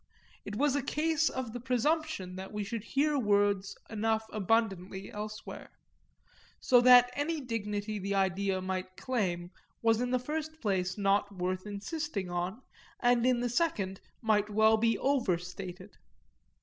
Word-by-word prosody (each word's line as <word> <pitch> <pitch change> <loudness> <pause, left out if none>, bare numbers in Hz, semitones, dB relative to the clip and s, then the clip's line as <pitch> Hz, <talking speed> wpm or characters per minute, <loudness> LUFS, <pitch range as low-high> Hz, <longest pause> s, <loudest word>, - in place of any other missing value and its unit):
It 205 - -5
was 280 +4 +2
a 285 - +1
case 315 +3 +1
of 255 -4 -4
the 245 - -4
presumption 255 - -1
that 190 +1 -7
we 210 -1 -3
should 205 +2 -4
hear 285 +4 +1
words 205 -3 +1
enough 220 0 0
abundantly 195 -2 0
elsewhere; 215 +1 -7 0.9
so 245 -1 +5
that 245 0 +8
any 310 +3 -1
dignity 210 -4 -3
the 200 +1 -2
idea 190 0 +1
might 185 0 -4
claim 180 -9 -2 0.3
was 225 0 +3
in 250 - 0
the 255 - +2
first 310 +4 -4
place 190 - -1
not 200 0 +2
worth 185 +1 -3
insisting 205 - -4
on, 180 +8 -3 0.4
and 245 0 +3
in 250 -1 +3
the 245 - +1
second 225 - -1 0.2
might 215 -1 +2
well 220 +1 +5
be 225 0 +2
overstated. 185 -6 -2
215 Hz, 145 wpm, -31 LUFS, 195-250 Hz, 0.9 s, that